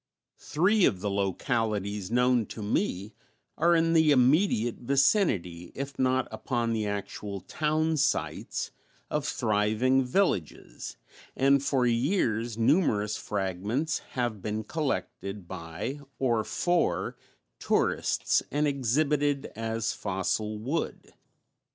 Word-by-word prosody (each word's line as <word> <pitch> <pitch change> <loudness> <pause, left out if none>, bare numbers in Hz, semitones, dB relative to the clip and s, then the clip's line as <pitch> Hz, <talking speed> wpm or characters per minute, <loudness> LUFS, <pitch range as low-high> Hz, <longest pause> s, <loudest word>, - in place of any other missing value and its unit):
Three 190 +7 +2
of 95 - +1
the 105 - -1
localities 100 0 -1
known 125 -1 +2
to 110 - -7
me 105 - -1 0.4
are 170 +2 +4
in 165 0 +3
the 160 -2 +5
immediate 130 - +3
vicinity, 120 - +1
if 140 0 -6
not 130 0 +2
upon 120 -3 -1
the 110 -2 -1
actual 100 0 -4
townsites 155 -1 -1 0.4
of 150 -1 -1
thriving 110 +4 +2
villages, 125 - -1 0.4
and 135 +1 +4
for 135 -3 +2
years 120 - +1
numerous 115 - +2
fragments 105 - -2 0.2
have 120 -5 -1
been 105 +2 -3
collected 105 - -3
by 85 - -5 0.2
(or 120 -4 +1
for) 175 +9 0 0.4
tourists - - +1
and 150 +1 +1
exhibited 145 +2 +1
as 115 0 -2
fossil 105 +2 -2
wood. 135 +10 -4
120 Hz, 105 wpm, -28 LUFS, 105-145 Hz, 0.4 s, the